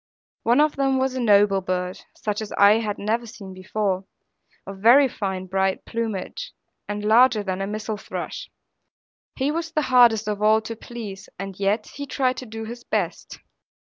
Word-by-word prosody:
One 240 Hz, +4 st, +3 dB
of 300 Hz, -1 st, +3 dB
them 270 Hz, -1 st, +2 dB
was 260 Hz, 0 st, 0 dB
a 260 Hz, -, -3 dB
noble 205 Hz, -4 st, +4 dB
bird, 180 Hz, 0 st, -3 dB
such 210 Hz, 0 st, -3 dB
as 215 Hz, -, -6 dB
I 205 Hz, +2 st, +6 dB, 0.2 s
never 215 Hz, +3 st, 0 dB
had 235 Hz, -, -10 dB
seen 195 Hz, -3 st, -10 dB
before, 190 Hz, 0 st, -2 dB, 0.6 s
of 195 Hz, 0 st, -8 dB
very 250 Hz, +7 st, +7 dB
fine 190 Hz, -6 st, -4 dB
bright 190 Hz, +1 st, -1 dB
plumage, 230 Hz, -, -4 dB, 0.3 s
and 210 Hz, 0 st, -4 dB
larger 225 Hz, 0 st, +5 dB
than 190 Hz, -1 st, -3 dB
a 195 Hz, -, -2 dB
missel 215 Hz, +1 st, -4 dB
thrush. -, -, -6 dB, 0.9 s
He 275 Hz, +2 st, 0 dB
was 330 Hz, +1 st, -3 dB
the 305 Hz, -2 st, 0 dB
hardest 230 Hz, -4 st, +6 dB
of 210 Hz, -1 st, -2 dB
all 215 Hz, +1 st, +5 dB
to 225 Hz, +1 st, -6 dB
please: 215 Hz, -4 st, -8 dB
and 195 Hz, 0 st, -7 dB
yet 205 Hz, +2 st, +1 dB
he 285 Hz, 0 st, -8 dB
tried 255 Hz, -2 st, 0 dB
to 255 Hz, -, -7 dB
do 225 Hz, +1 st, -6 dB
his 240 Hz, +2 st, -8 dB
best. -, -, -3 dB
215 Hz, 180 wpm, -23 LUFS, 195-245 Hz, 0.9 s, very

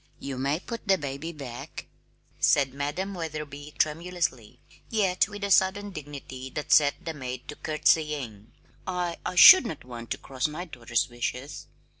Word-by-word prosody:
"You 135 Hz, -2 st, -5 dB
may 140 Hz, +4 st, 0 dB
put 230 Hz, +2 st, -8 dB
the 195 Hz, -1 st, +5 dB
baby 145 Hz, +2 st, -5 dB
back," 135 Hz, -6 st, -8 dB, 0.5 s
said 135 Hz, -2 st, +3 dB
Madam 150 Hz, +8 st, -3 dB
Wetherby 150 Hz, -3 st, -6 dB
tremulously, 155 Hz, -7 st, -1 dB, 0.3 s
yet 195 Hz, -5 st, +2 dB
with 205 Hz, 0 st, -8 dB
a 200 Hz, -, -1 dB
sudden 200 Hz, +2 st, +3 dB
dignity 140 Hz, -4 st, -8 dB
that 150 Hz, -, -4 dB
set 145 Hz, -2 st, +4 dB
the 165 Hz, -, -3 dB
maid 130 Hz, -3 st, -6 dB
to 150 Hz, -, -6 dB
curtsying. 150 Hz, -9 st, 0 dB, 0.4 s
"I 180 Hz, -2 st, -2 dB
I 180 Hz, -, -4 dB
should 370 Hz, -, +10 dB
not 150 Hz, -, -7 dB
want 120 Hz, -2 st, -9 dB
to -, -, -2 dB
cross 130 Hz, 0 st, -2 dB
my 155 Hz, +4 st, -6 dB
daughter's 120 Hz, -7 st, -1 dB
wishes." 125 Hz, +3 st, -5 dB
150 Hz, 155 wpm, -27 LUFS, 130-180 Hz, 0.5 s, should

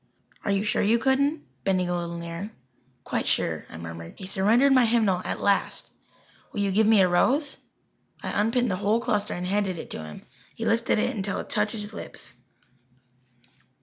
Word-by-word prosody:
"Are -, -, -2 dB
you 200 Hz, 0 st, +2 dB
sure 210 Hz, -, +1 dB
you 220 Hz, +3 st, +4 dB
couldn't?" 280 Hz, +5 st, +1 dB, 0.2 s
bending 185 Hz, -2 st, +1 dB
a 175 Hz, -, 0 dB
little 170 Hz, -1 st, -3 dB
nearer. 170 Hz, +4 st, -5 dB, 0.5 s
"Quite -, -, -2 dB
sure," -, -, 0 dB
I -, -, -9 dB
murmured. 85 Hz, 0 st, -8 dB
He 190 Hz, -, -8 dB
surrendered 220 Hz, +9 st, +4 dB
my 255 Hz, -3 st, +5 dB
hymnal 215 Hz, -6 st, +2 dB
at -, -, -3 dB
last. 200 Hz, -1 st, +1 dB, 0.6 s
"Will 205 Hz, -, -2 dB
you 200 Hz, -1 st, +1 dB
give 215 Hz, +3 st, +3 dB
me 220 Hz, -3 st, +6 dB
a 185 Hz, -, +5 dB
rose?" 270 Hz, -, +2 dB, 0.7 s
I -, -, 0 dB
unpinned 230 Hz, +1 st, +1 dB
the 185 Hz, -, -1 dB
whole 210 Hz, +3 st, +2 dB
cluster 210 Hz, -4 st, -1 dB
and 180 Hz, -, -4 dB
handed 190 Hz, -1 st, 0 dB
it -, -, -8 dB
to 80 Hz, -, -5 dB
him. 75 Hz, -1 st, -10 dB, 0.3 s
He 225 Hz, -, -4 dB
lifted 230 Hz, 0 st, +2 dB
it -, -, 0 dB
until 200 Hz, -1 st, -2 dB
it -, -, -7 dB
touched 210 Hz, +1 st, +2 dB
his 210 Hz, -1 st, -5 dB
lips. -, -, -6 dB
205 Hz, 185 wpm, -26 LUFS, 185-230 Hz, 0.7 s, me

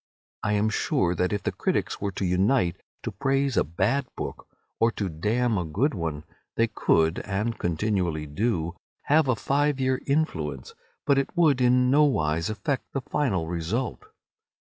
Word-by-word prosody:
I 105 Hz, -, 0 dB
am 105 Hz, +1 st, +2 dB
sure 90 Hz, -4 st, +1 dB
that 90 Hz, +1 st, 0 dB
if 105 Hz, -2 st, -2 dB
the -, -, 0 dB
critics -, -, -1 dB
were 100 Hz, 0 st, -1 dB
to 95 Hz, -, -2 dB
unite 90 Hz, +1 st, +2 dB, 0.2 s
to -, -, -3 dB
praise 135 Hz, -1 st, 0 dB
a -, -, +4 dB
bad 110 Hz, -, 0 dB
book -, -, -6 dB, 0.3 s
or 115 Hz, -, +4 dB
to 100 Hz, -3 st, -2 dB
damn 105 Hz, +7 st, 0 dB
a -, -, -1 dB
good 105 Hz, -, 0 dB
one 80 Hz, -6 st, -3 dB, 0.3 s
they 115 Hz, -, +3 dB
could 80 Hz, -7 st, +2 dB
(and 105 Hz, +4 st, -2 dB
continually 85 Hz, -3 st, -1 dB
do) 85 Hz, +1 st, -1 dB, 0.3 s
have 155 Hz, 0 st, +3 dB
a 130 Hz, -, +3 dB
five 145 Hz, +4 st, +1 dB
year 130 Hz, 0 st, +1 dB
influence, 80 Hz, -, -1 dB, 0.3 s
but 140 Hz, -2 st, +4 dB
it 140 Hz, -, -1 dB
would 150 Hz, -7 st, +4 dB
in 125 Hz, 0 st, +4 dB
no 150 Hz, +2 st, +6 dB
wise 80 Hz, -, +1 dB
affect 135 Hz, +6 st, -3 dB
the 135 Hz, -, -1 dB
final 100 Hz, -, -1 dB
result. 90 Hz, -, -3 dB
105 Hz, 170 wpm, -26 LUFS, 85-135 Hz, 0.3 s, no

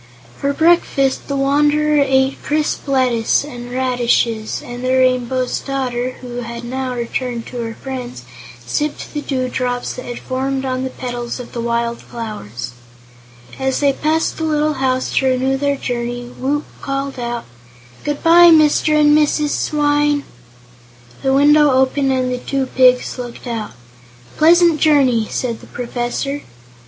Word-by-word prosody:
For 280 Hz, -, -1 dB
breakfast 315 Hz, -4 st, +2 dB
the 280 Hz, -, -2 dB
Wanderer 295 Hz, +2 st, +3 dB
ate 265 Hz, 0 st, +1 dB
crisp 300 Hz, 0 st, -1 dB
lettuce 255 Hz, -4 st, +2 dB
and 245 Hz, -4 st, -8 dB
radishes, 240 Hz, -3 st, 0 dB
and 245 Hz, +1 st, -8 dB
the 255 Hz, 0 st, +1 dB
Rainbow's 255 Hz, 0 st, +1 dB
Daughter, 255 Hz, -2 st, -2 dB
who 245 Hz, -1 st, -7 dB
had 235 Hz, 0 st, -6 dB
now 255 Hz, +1 st, -3 dB
returned 240 Hz, 0 st, -3 dB
to 250 Hz, -, -8 dB
her 225 Hz, -1 st, -4 dB
friends, 250 Hz, -, -7 dB, 0.4 s
sipped 295 Hz, -, -3 dB
the 295 Hz, -, -3 dB
dewdrops 255 Hz, -2 st, -2 dB
that 250 Hz, -, -8 dB
had 245 Hz, -, -6 dB
formed 265 Hz, +1 st, -2 dB
on 255 Hz, 0 st, -2 dB
the 260 Hz, -, -2 dB
petals 245 Hz, -1 st, -5 dB
of 245 Hz, -, -8 dB
the 235 Hz, -, -3 dB
wild 235 Hz, 0 st, -1 dB
flowers. 125 Hz, -, -7 dB, 0.9 s
As 265 Hz, 0 st, 0 dB
they 280 Hz, -1 st, +3 dB
passed 315 Hz, +3 st, 0 dB
the -, -, -2 dB
little 305 Hz, -1 st, +1 dB
house 260 Hz, -2 st, -1 dB
to 265 Hz, -, +3 dB
renew 260 Hz, +1 st, +1 dB
their 280 Hz, +1 st, 0 dB
journey, 245 Hz, -1 st, -4 dB
Woot 290 Hz, +3 st, -1 dB, 0.2 s
called 275 Hz, -1 st, -3 dB
out: 240 Hz, -1 st, -4 dB, 0.6 s
"Good 295 Hz, -1 st, -3 dB
bye, 345 Hz, +1 st, +8 dB
Mr. 305 Hz, -1 st, +4 dB
and 295 Hz, 0 st, +5 dB
Mrs. 300 Hz, 0 st, +2 dB
Swyne!" 290 Hz, -1 st, +1 dB, 1.0 s
The 270 Hz, -, +1 dB
window 295 Hz, +2 st, +5 dB
opened 265 Hz, +1 st, +2 dB
and 255 Hz, -1 st, 0 dB
the 250 Hz, -, -3 dB
two 270 Hz, +1 st, -2 dB
pigs 255 Hz, -1 st, +3 dB
looked 245 Hz, 0 st, -7 dB
out. 230 Hz, -3 st, -4 dB, 0.6 s
"A -, -, -17 dB
pleasant 335 Hz, 0 st, +5 dB
journey," 260 Hz, -8 st, +3 dB
said 235 Hz, -3 st, -3 dB
the -, -, -14 dB
Professor. 245 Hz, +4 st, -3 dB
260 Hz, 150 wpm, -18 LUFS, 245-290 Hz, 1.0 s, bye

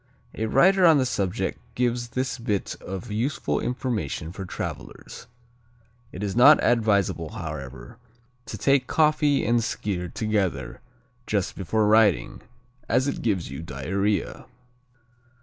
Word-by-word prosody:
A 110 Hz, -, -2 dB
writer 185 Hz, -, +4 dB
on 165 Hz, -3 st, +7 dB
the 130 Hz, -, +2 dB
subject 100 Hz, -7 st, -2 dB, 0.2 s
gives 120 Hz, -1 st, 0 dB
this 125 Hz, +1 st, -3 dB
bit 105 Hz, -4 st, -2 dB
of 95 Hz, +4 st, -7 dB
useful 120 Hz, +7 st, -1 dB
information 115 Hz, -, -3 dB
for 95 Hz, +1 st, -7 dB
travelers: 90 Hz, -, -7 dB, 0.8 s
"It 95 Hz, -, -7 dB
is 100 Hz, -1 st, -3 dB
not 140 Hz, +5 st, +8 dB
advisable, 100 Hz, -8 st, +1 dB
however, 70 Hz, -7 st, -8 dB, 0.5 s
to 110 Hz, -, -6 dB
take 135 Hz, +3 st, +2 dB
coffee 150 Hz, -2 st, +2 dB
and 120 Hz, +1 st, +3 dB
Skyr 95 Hz, -5 st, -3 dB
together 105 Hz, -4 st, -2 dB, 0.5 s
just 100 Hz, -2 st, -1 dB
before 105 Hz, +3 st, 0 dB
riding, 105 Hz, -4 st, +3 dB, 0.5 s
as 125 Hz, +4 st, +2 dB
it 140 Hz, -, -3 dB
gives 100 Hz, -, -1 dB
you 70 Hz, -, -6 dB
diarrhea." 95 Hz, +8 st, -2 dB
110 Hz, 125 wpm, -25 LUFS, 95-125 Hz, 0.8 s, not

